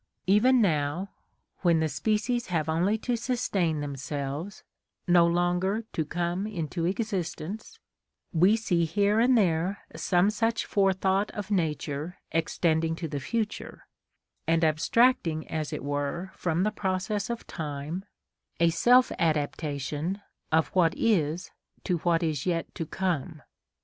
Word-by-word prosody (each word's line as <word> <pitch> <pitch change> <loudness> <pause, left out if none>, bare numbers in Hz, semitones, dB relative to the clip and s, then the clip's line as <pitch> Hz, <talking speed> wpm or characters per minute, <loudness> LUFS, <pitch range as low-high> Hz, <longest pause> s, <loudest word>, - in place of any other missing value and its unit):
Even 235 +7 +5
now, 155 +2 0 0.5
when 170 -3 +3
the 160 - +2
species 220 - 0
have 160 -4 -1
only 175 +7 +2
to 245 +2 -1
sustain 200 - 0
themselves, 145 +5 -5 0.4
no 175 -1 +6
longer 175 +5 +1
to 160 - 0
come 175 +5 -2
into 170 -4 -3
existence, 195 0 -3 0.6
we 180 +6 +5
see 175 -7 +1
here 200 +6 +2
and 245 +2 +5
there 185 0 +1
some 185 +2 +2
such 225 +1 0
forethought 195 0 +2
of 205 0 -5
nature 155 -2 -1
extending 165 0 +1
to 165 0 -4
the 145 -2 -4
future, 220 - -4 0.6
and 165 0 +3
abstracting 160 - +2
as 155 -2 -3
it - - -4
were 145 +6 -2
from 175 0 0
the 215 - +1
process 195 +1 -2
of 235 -1 -4
time, 150 +3 -5 0.6
a 170 0 +4
self 245 +9 +5
adaptation 150 +2 -1 0.3
of 160 0 +3
what 175 -2 +2
is 175 -6 +1 0.3
to 175 -3 0
what 170 0 +1
is 155 -1 -1
yet 170 -2 -1
to 165 - -4
come. 170 -5 -2
175 Hz, 130 wpm, -28 LUFS, 160-205 Hz, 0.6 s, no